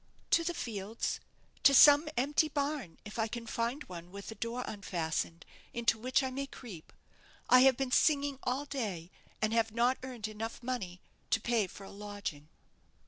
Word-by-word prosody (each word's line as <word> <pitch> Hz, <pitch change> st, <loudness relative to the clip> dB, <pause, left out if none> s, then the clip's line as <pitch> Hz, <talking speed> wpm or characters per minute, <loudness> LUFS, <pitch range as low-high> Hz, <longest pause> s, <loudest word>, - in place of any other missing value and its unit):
"To 335 Hz, -, +5 dB
the 345 Hz, +1 st, -2 dB
fields 220 Hz, -, -3 dB, 0.4 s
to 275 Hz, -, +7 dB
some 290 Hz, +3 st, +8 dB
empty 290 Hz, +5 st, +3 dB
barn, 285 Hz, -, -2 dB
if 210 Hz, +2 st, -7 dB
I 220 Hz, -, +2 dB
can 235 Hz, +1 st, -6 dB
find 235 Hz, +5 st, -2 dB
one 175 Hz, -1 st, -9 dB
with 200 Hz, +2 st, -8 dB
a -, -, -5 dB
door 230 Hz, +3 st, -3 dB
unfastened, 170 Hz, -4 st, -3 dB, 0.3 s
into 230 Hz, -2 st, +2 dB
which 255 Hz, +4 st, +2 dB
I 260 Hz, -, -2 dB
may 275 Hz, +2 st, -3 dB
creep. 215 Hz, -12 st, -10 dB, 0.6 s
I 255 Hz, -, +9 dB
have 260 Hz, -1 st, +6 dB
been 270 Hz, -2 st, -2 dB
singing 285 Hz, -1 st, +3 dB
all 265 Hz, +3 st, -1 dB
day, 200 Hz, -, -4 dB, 0.3 s
and 215 Hz, +1 st, +2 dB
have 225 Hz, -1 st, +2 dB
not 240 Hz, +3 st, +2 dB
earned 250 Hz, -4 st, -6 dB, 0.4 s
money 235 Hz, -8 st, -3 dB
enough -, -, -37 dB
to -, -, +3 dB
pay 230 Hz, -4 st, +1 dB
for 195 Hz, -, -11 dB
a 195 Hz, -, -10 dB
lodging." 200 Hz, -7 st, -6 dB
235 Hz, 175 wpm, -32 LUFS, 200-270 Hz, 0.6 s, I